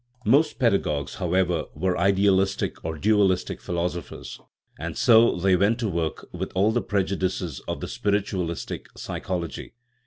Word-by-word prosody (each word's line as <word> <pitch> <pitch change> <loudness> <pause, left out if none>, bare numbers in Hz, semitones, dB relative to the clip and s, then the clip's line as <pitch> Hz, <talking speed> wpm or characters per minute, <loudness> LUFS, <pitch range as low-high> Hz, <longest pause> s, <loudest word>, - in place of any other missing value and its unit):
Most 140 +8 +3
pedagogues, 100 - 0
how 90 -2 -1
ever, 90 -3 +1
were 90 +4 0
idealistic 95 +1 +2
or 80 0 -4
dualistic 95 0 +2
philosophers, 85 -3 -4 0.4
and - - -5
so 115 0 +6
they 95 +1 +3
went 100 +5 +2
to 120 -2 -1
work 85 -3 -2
with - - -4
all 100 +4 +3
the 120 +1 +1
prejudices 95 -5 -1
of - - -3
the - - -4
spir 100 - -1
itualistic 95 -5 -2
psychology. 85 +1 -5
95 Hz, 145 wpm, -25 LUFS, 85-100 Hz, 0.4 s, so